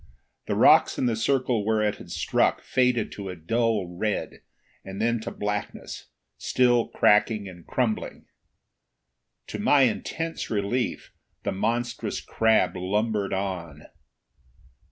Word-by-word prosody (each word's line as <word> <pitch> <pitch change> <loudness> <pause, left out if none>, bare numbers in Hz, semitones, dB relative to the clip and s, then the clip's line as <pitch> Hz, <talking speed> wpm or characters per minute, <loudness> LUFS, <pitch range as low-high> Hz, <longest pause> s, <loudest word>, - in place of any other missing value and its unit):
The - - 0
rocks - - +5
in - - 0
the 120 -2 +1
circle 125 -1 +1
where 110 0 +1
it 105 -1 0
had - - -12
struck - - +1
faded 125 -3 +1
to 100 -2 -7
a 90 - -5
dull 110 +4 0
red 95 +4 -3 0.4
and 95 +1 -8
then 115 +1 +1
to 110 - -5
blackness, 105 0 -5 0.3
still 120 -2 +2
cracking 105 0 +2
and 90 -3 -12
crumbling. 120 -4 -2 1.2
To - - -6
my 145 -2 +4
intense 160 +7 -2
relief, 110 +4 -2 0.3
the 100 - -1
monstrous 115 +5 -2
crab 110 -5 +2
lumbered 105 +2 -1
on. 90 -6 -4
110 Hz, 125 wpm, -26 LUFS, 100-120 Hz, 1.2 s, rocks